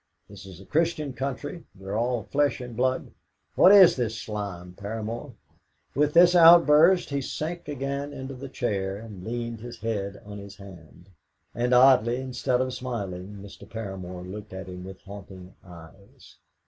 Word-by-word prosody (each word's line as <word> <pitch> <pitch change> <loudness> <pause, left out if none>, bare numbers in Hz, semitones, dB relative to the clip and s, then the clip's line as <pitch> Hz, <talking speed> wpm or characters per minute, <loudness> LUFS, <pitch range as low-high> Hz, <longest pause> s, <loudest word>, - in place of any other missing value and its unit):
This 100 -1 -12
is 90 -2 -11
a 95 - -13
Christian 155 - 0
country; 140 +5 -5
we 95 - -14
are 100 +2 -4
all 120 0 0
flesh 140 +7 0
and 125 -2 -8
blood. 130 +2 -1 0.4
What 185 - +7
is 195 -3 +8
this 115 -3 -2
slime, 100 -5 -6
Paramor?" 110 +6 -6 0.6
With 150 +3 +1
this 175 +1 +7
outburst 170 0 +7
he 140 0 -1
sank 165 +5 -5
again 140 0 -4
into 135 -1 -7
the 135 +1 -8
chair, 100 -7 -2
and 105 -4 -10
leaned 115 +1 -4
his 120 +1 -9
head 100 -3 -3
on 105 0 -8
his 100 0 -11
hand. 90 -2 -15 0.4
And 120 +1 -1
oddly, 125 -2 +5
instead 130 -1 -1
of 130 0 -2
smiling, 100 -7 -5
Mr. 100 - -13
Paramor 95 -5 -7
looked 100 +2 -9
at 95 -1 -6
him 90 -1 -9
with 95 0 -10
haunting 95 -2 -11
eyes. 90 +2 -16
115 Hz, 160 wpm, -26 LUFS, 100-135 Hz, 0.6 s, is